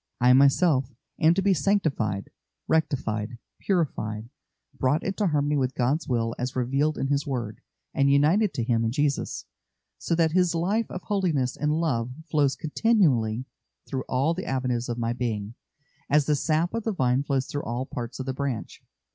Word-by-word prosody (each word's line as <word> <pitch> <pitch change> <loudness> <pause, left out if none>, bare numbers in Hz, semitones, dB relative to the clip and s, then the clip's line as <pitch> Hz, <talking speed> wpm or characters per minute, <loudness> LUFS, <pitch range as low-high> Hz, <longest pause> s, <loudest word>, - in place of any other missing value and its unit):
I 125 +1 +6
myself 140 +1 +4 0.3
am 160 +2 +5
to 195 - +1
be 200 0 +4
sanctified, 140 - 0 0.4
rectified, 120 -8 0 0.2
purified, 115 - -1 0.5
brought 135 +3 +1
into 195 +1 0
harmony 145 -2 +1
with 130 -1 -1
God's 135 +5 0
will 115 -2 0
as 125 +2 -3
revealed 135 +5 0
in 135 - -1
His 140 0 0
word, 120 -6 -4 0.3
and 140 0 +3
united 160 +9 +4
to 120 - -1
Him 115 -1 +1
in 115 - 0
Jesus, 145 +1 -1 0.5
so 170 - 0
that 165 -1 +2
His 180 0 +2
life 200 +7 0
of 185 - -6
holiness 165 -11 0
and 150 +2 0
love 125 -8 0 0.2
flows 145 -3 +2
continually 145 - +1 0.4
through 130 -1 -3
all 135 +6 +2
the 185 +2 -5
avenues 125 -2 -1
of 120 - -2
my 115 0 -1
being, 110 -3 -3 0.6
as 150 0 +4
the 150 - +2
sap 160 +5 0
of 230 -1 -2
the 225 - -1
vine 130 -5 +2
flows 140 -2 -1
through 145 - -4
all 120 +2 -3
parts 120 -1 -6
of 130 - -3
the 130 - -2
branch. 135 -4 -4
140 Hz, 170 wpm, -26 LUFS, 125-160 Hz, 0.6 s, I